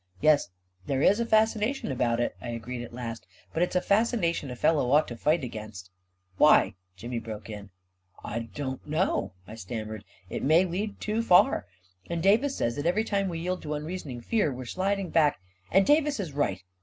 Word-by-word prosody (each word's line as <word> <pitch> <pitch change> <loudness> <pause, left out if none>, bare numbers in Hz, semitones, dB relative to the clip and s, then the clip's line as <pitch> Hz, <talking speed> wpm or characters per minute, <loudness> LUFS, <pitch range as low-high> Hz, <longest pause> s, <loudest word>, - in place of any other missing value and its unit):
" 90 - -33
Yes, 150 -3 +4 0.4
there 135 0 0
is 205 +3 +5
a 235 - 0
fascination 220 - +2
about 120 -2 0
it," 120 - -1
I 120 - -6
agreed 120 +1 -5
at 120 - -9
last, 115 -1 -6 0.3
"but 165 - -1
it's 180 - 0
a 180 - +3
fascination 200 - +1
a 125 - -5
fellow 140 0 +2
ought 150 +3 +4
to 120 - -6
fight 150 +6 +1
against 105 -5 -7 0.2
..." 95 0 -39
"Why?" 150 -7 +6 0.2
Jimmy 120 +5 -4
broke 110 -1 -8
in. 105 -1 -7
II - - -19 0.6
I 115 - -3 0.2
don't 135 -2 -5
know," 155 - 0
I - - -9
stammered 110 0 -6 0.2
" 95 - -34
It - - -3
may 160 +6 +4
lead 200 +4 -3
too 215 +2 -1
far. 180 - +4 0.4
And 170 -1 -2
Davis 245 +8 +3
says 115 - 0
that 145 +3 -1
every 185 +6 +2
time 200 -3 0
we 170 - -4
yield 180 +2 -3
to 150 0 -3
unreasoning 150 -5 -5
fear, 205 - +1
we're 130 0 -6
sliding 190 +6 -1
back.. 150 - +3
." 95 0 -38
" 95 - -32
And 195 +1 +5
Davis 295 -3 +3
is 175 -8 -4
right 100 -10 -1
150 Hz, 210 wpm, -28 LUFS, 115-190 Hz, 0.6 s, Why